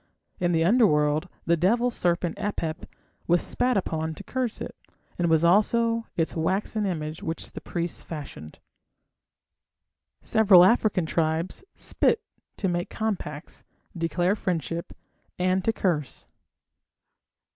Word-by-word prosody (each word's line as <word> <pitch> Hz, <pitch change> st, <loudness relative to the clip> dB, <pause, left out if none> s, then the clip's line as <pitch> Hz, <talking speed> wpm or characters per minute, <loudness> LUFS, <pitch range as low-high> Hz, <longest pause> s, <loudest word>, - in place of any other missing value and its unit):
In 175 Hz, -1 st, +1 dB
the 165 Hz, -1 st, +2 dB
Underworld 165 Hz, -6 st, +3 dB, 0.2 s
the 170 Hz, -, +3 dB
devil 235 Hz, +9 st, +2 dB
serpent 175 Hz, -4 st, 0 dB
Apep 170 Hz, -6 st, -3 dB, 0.4 s
was 175 Hz, +1 st, +4 dB
spat 250 Hz, +4 st, 0 dB
upon 160 Hz, -3 st, -2 dB
to -, -, -9 dB
curse 255 Hz, -3 st, -3 dB
it, -, -, -6 dB, 0.4 s
as 175 Hz, -, +2 dB
was 160 Hz, 0 st, +3 dB
also 230 Hz, +5 st, +3 dB
its 165 Hz, -1 st, 0 dB
waxen 195 Hz, +5 st, 0 dB
image 155 Hz, -3 st, -4 dB
which 165 Hz, 0 st, -5 dB
the -, -, -8 dB
priests 170 Hz, 0 st, -3 dB
fashioned. 140 Hz, -, -8 dB, 1.7 s
Several 195 Hz, -5 st, +6 dB
African 205 Hz, -4 st, +3 dB
tribes 160 Hz, -, -1 dB
spit 445 Hz, -, +1 dB, 0.3 s
to 195 Hz, -, -1 dB
make 175 Hz, -1 st, -1 dB
compacts, 180 Hz, -8 st, -4 dB, 0.3 s
declare 175 Hz, +3 st, +1 dB
friendship, 170 Hz, -5 st, -3 dB, 0.5 s
and 185 Hz, +1 st, +1 dB
to 225 Hz, -, +2 dB
curse. 165 Hz, -, -2 dB
175 Hz, 120 wpm, -26 LUFS, 160-210 Hz, 1.7 s, Several